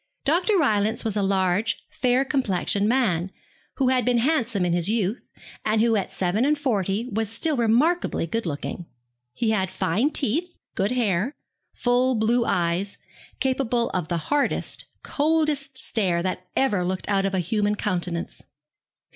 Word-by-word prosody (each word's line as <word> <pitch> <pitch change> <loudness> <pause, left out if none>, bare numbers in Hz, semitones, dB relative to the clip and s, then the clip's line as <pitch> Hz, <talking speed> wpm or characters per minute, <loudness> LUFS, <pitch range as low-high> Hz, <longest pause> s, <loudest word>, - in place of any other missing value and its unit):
Dr. 355 +8 +3
Rylance 220 - +1
was 220 -2 -1
a 205 - +1
large 195 +1 +1
fair 255 +1 +1
complexioned 210 -6 0
man, 195 -9 +1 0.5
who 265 -2 +2
had 255 -1 +2
been 245 -1 +2
handsome 235 - +1
in 175 - +1
his 175 +2 +1
youth, 220 +1 -1 0.3
and 215 0 +1
who 225 0 +3
at 200 - -1
seven 190 +5 0
and 300 +2 +2
forty 215 -5 -1
was 220 0 -1
still 300 +8 0
remarkably 245 - +2
good 225 +4 -3
looking. 165 +3 -5 0.4
He 220 - 0
had 190 -4 0
fine 210 - 0
teeth, 315 +6 -1 0.2
good 195 +2 0
hair, 225 - 0 0.4
full 250 +1 +2
blue 230 +2 +2
eyes, 175 +3 0 0.4
capable 255 -3 0
of 180 -4 -2
the 170 - -1
hardest, 285 - -1 0.2
coldest 295 -3 0
stare 185 -9 0
that 185 0 -3
ever 210 -9 +2
looked 185 +1 -3
out 195 -1 +2
of 195 - -2
a - - +1
human 205 +4 0
countenance. 175 -4 -2
220 Hz, 155 wpm, -24 LUFS, 190-260 Hz, 0.5 s, Dr